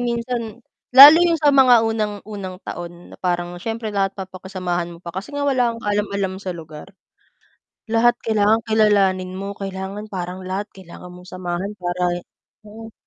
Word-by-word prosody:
minsan 235 -1 -3 0.3
lalo 285 +4 +12
yung 345 -1 +3
sa 295 - +4
mga 255 -4 +6
unang 215 -2 -2
unang 195 -3 -7
taon 175 0 -8
na - - -11
parang 175 -1 -2
siyempre 225 +3 -4
lahat 195 -1 -1
papakisamahan 185 -2 -5
mo 170 - -13
pa 170 - -7
kasi 190 - -7
nga 285 - -2
wala 250 -4 +1
kang 230 - -11
kaalam-alam 200 -2 -1
sa 190 -2 -5
lugar. 160 +3 -11 0.9
Lahat 230 +2 +4
kailangang 220 0 +2
kilalanin 200 -4 +2
mo, 195 +1 -6
kailangan 195 +1 -6
parang 185 0 -5
lahat 190 +3 -4
kailangan 180 -1 -12
mong 180 0 -13
samahan 185 +2 -4
para 175 0 -1 0.5
mm. 225 +1 -11
200 Hz, 155 wpm, -20 LUFS, 180-225 Hz, 0.9 s, lalo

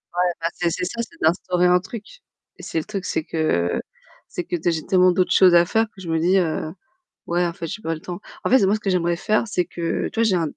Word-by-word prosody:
Ouais, 180 0 +2
bah 165 - +1
c'est 175 -1 0
c'est 180 +1 -2
ça, 235 +5 -3
c'est 330 +8 -9
d'instaurer 180 +2 +2
un 180 0 +5
truc 210 +4 -8 0.5
et - - -12
c'est 165 - -2
le - - -4
truc, 200 -3 -5
c'est 160 - -1
que 90 - 0 0.5
c'est 175 - -5
que, 175 - -3
tu 165 - -5
sais, 175 - +3
j'ai 160 -1 -3
tellement 185 -1 +4
d'autres 185 0 +1
choses 180 -2 +6
à 170 0 +6
faire 225 +4 +2
que 205 -3 -16
je 170 - -7
me 160 0 +1
dis, 180 +4 +3
heu: 160 -3 0 0.6
«Ouais, 175 +1 +1
en 170 - -2
fait, 165 - -6
j'ai 215 - -6
pas 165 0 -1
le 155 - -9
temps». 180 +3 -7 0.2
En - - 0
fait, 255 -5 +5
moi, 200 - +3
ce 215 - -2
que 195 - -1
j'aimerais 175 -1 +1
faire, 215 +4 +1
c'est 180 -4 0
que, 170 -1 -2
tu 225 - -3
vois, - - +4
j'ai 205 -4 +2
un 165 -3 0
180 Hz, 285 wpm, -22 LUFS, 165-195 Hz, 0.6 s, choses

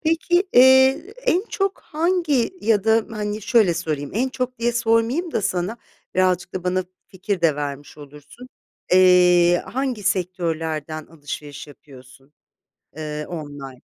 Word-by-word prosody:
Peki, 335 +3 +1
eee, 265 - +5
en 375 -2 +2
çok 390 -1 -2
hangi 315 -5 0
Ya 215 -2 +1
da, 225 0 +3
hani, 210 -1 -4
şöyle 215 -6 +3
sorayım: 155 -4 -3
En 255 +4 0
çok 255 -1 -4
diye 235 +1 0
sormayayım 235 +8 0
da 210 - -1
sana 190 +2 -2 0.4
Birazcık 185 0 0
da 185 -1 -5
bana 185 0 0 0.2
fikir 190 0 -4
de 160 -4 +2
vermiş 145 0 -6
olursun. 150 - -13 0.4
Eee, 180 -1 +5
Hangi 255 -4 -3
sektörlerden 165 -5 -2
alışveriş 145 -2 -8
yapıyorsun, 135 -1 -17 0.6
eee, 150 -1 -5
online? 145 -6 -8
185 Hz, 130 wpm, -21 LUFS, 155-245 Hz, 0.6 s, eee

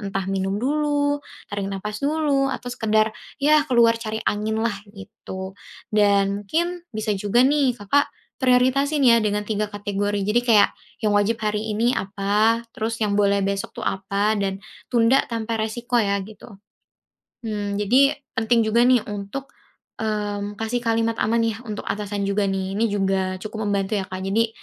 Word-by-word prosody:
entah 195 -2 -3
minum 195 0 -1
dulu, 290 +3 0 0.3
tarik 200 -1 -3
napas 210 +2 -5
dulu 285 -2 +1
atau 245 - -4
sekedar 220 -2 +1 0.2
ya 300 +1 +4
keluar 230 -2 +4
cari 220 -1 -3
angin 215 +1 0
lah 230 - +1 0.2
gitu. 190 -1 -9 0.4
Dan 200 -1 +3
mungkin 340 - -1
bisa 215 -1 -2
juga 205 +5 +2
nih 275 -3 +2
Kakak 260 +8 +1 0.3
prioritasin 260 +3 +3
ya 235 -2 +6
dengan 210 0 0
3 210 -1 -1
kategori 205 0 -2
jadi 215 +3 +3
kaya 225 -4 +6 0.4
yang 210 - +3
wajib 205 +2 +2
hari 210 +1 -1
ini 225 +3 +1
apa, 205 +4 +1
terus 225 +1 -3
yang 205 - 0
boleh 200 -1 +2
besok 200 0 -3
tuh - - -5
apa, 200 +2 0
dan 195 -1 -1 0.3
tunda 240 +2 +4
tanpa 230 -1 -2
resiko 240 +2 0
ya 200 -2 +1
gitu. 210 +1 -13 1.0
Mmm, 205 -2 -2
jadi 260 +8 +3 0.2
penting 225 0 +3
juga 230 +2 +3
nih 250 -2 +5
untuk, 205 +7 -6 0.5
mmm, 205 -1 -2
kasih 225 +2 -1
kalimat 230 0 +1
aman 230 +1 +2
ya 225 -1 -1
untuk 210 - -5
atasan 205 -1 -2
juga 200 +1 +1
nih, 190 0 -2
ini 225 - +2
juga 190 -2 0
cukup 215 +1 -5
membantu 200 0 0
ya, - - -5
Kak, 185 0 -5
jadi 225 +4 +1
215 Hz, 160 wpm, -23 LUFS, 200-235 Hz, 1.0 s, ya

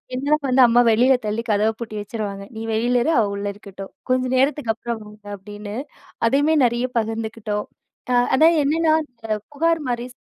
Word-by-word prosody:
என்ன 285 +4 0
வந்து 260 +1 +4
அம்மா 240 +1 +5
வெளியில 250 +4 +4
தள்ளி 215 +2 -2
கதவ 210 +1 +3
பூட்டி 220 -2 -6
வச்சுருவாங்க, 205 -2 -5
"நீ - - -5
வெளியில 240 +2 +2
இரு, 320 - +1
அவ 220 - +3
உள்ள 200 - -4
இருக்கட்டும். 195 -2 -10 0.2
கொஞ்ச 255 0 +2
நேரத்துக்கப்புறம் 235 -5 -1
வாங்க" 210 0 -15
அப்படின்னு. 205 +1 -8 0.5
அதையுமே 290 +6 +3
நிறைய 240 +1 0
பகிர்ந்துக்கிட்டோம். 220 -1 -3 0.4
அ - - +2 0.2
அதான் 325 +4 +5
என்னன்னா, 315 +2 +2
இந்த 245 -4 -39 0.3
புகார் 330 +2 +1
மாரி 240 0 -2
230 Hz, 160 wpm, -22 LUFS, 210-265 Hz, 0.5 s, அம்மா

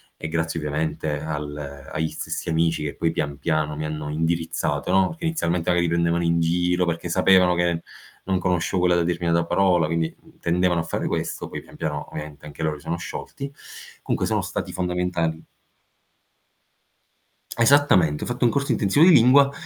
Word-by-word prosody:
e - - -6
grazie 80 +1 -2
ovviamente 75 0 -2
al 75 -2 -6
agli 80 +1 -1
stessi - - -5
amici 80 -1 +1
che 75 - -4
poi 80 - 0
pian 75 -3 -3
piano 80 -2 0
mi 75 - -4
hanno 75 -1 -4
indirizzato, 80 +3 -1
no 95 0 +4
perché 165 0 -7
inizialmente 90 - 0
magari 85 0 +2
prendevano 85 0 +1
in 85 0 +2
giro 90 +2 +1
perché 85 0 -3
sapevano 90 0 +4
che 85 -1 0 0.4
non 95 -1 0
conoscevo 90 0 0
quella 90 -1 +4
determinata 85 -1 0
parola, 90 -2 +3
quindi 80 0 -1 0.2
tendevano 85 0 +1
a - - -1
fare - - -3
questo. - - -3
Poi, - - -5
pian - - -17
piano 75 -2 -4
ovviamente 75 -1 -8
anche 75 +1 -7
loro 75 -1 -1
si 70 - -16
sono - - -2
sciolti 135 +10 -7 0.5
comunque, - - -1
sono - - 0
stati - - -4
fondamentali. 90 -3 -1 2.1
Esattamente, 115 - +4
ho - - -4
fatto 120 +1 0
un 120 - +4
corso 140 -1 0
intensivo 110 - +4
di 185 - +8
lingua, 140 0 +6
85 Hz, 170 wpm, -23 LUFS, 80-90 Hz, 2.1 s, di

